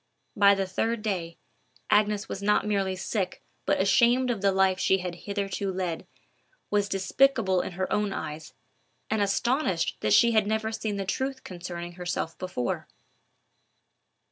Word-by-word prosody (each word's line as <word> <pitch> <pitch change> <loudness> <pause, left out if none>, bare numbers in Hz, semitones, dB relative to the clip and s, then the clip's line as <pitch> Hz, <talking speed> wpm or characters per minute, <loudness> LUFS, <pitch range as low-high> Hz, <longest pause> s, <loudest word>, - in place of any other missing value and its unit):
By 200 0 +6
the 195 0 -1
third 220 +4 -1
day, 175 -6 -3 0.5
Agnes 210 0 +3
was 195 - -5
not 210 +1 +2
merely 195 -2 0
sick 190 0 -3 0.2
but - - +2
ashamed 240 +6 +4
of 220 -5 -3
the 200 -1 +3
life 190 -1 +2
she 190 - +3
had 180 -2 -4
hitherto 200 +2 -3
led, 180 -3 -3 0.6
was 205 -1 +1
despicable 195 0 +2
in - - -6
her 185 +2 -1
own 210 -1 +1
eyes, 155 -3 -6 0.6
and 220 -1 +1
astonished 200 - +1
that 105 - +1
she 235 - +6
had 215 -2 +3
never 220 +1 0
seen 220 -2 -3
the 195 - -3
truth 260 +6 -2
concerning 175 -1 -6
herself 175 -2 -3
before. 180 -10 -3
195 Hz, 150 wpm, -27 LUFS, 185-215 Hz, 0.6 s, By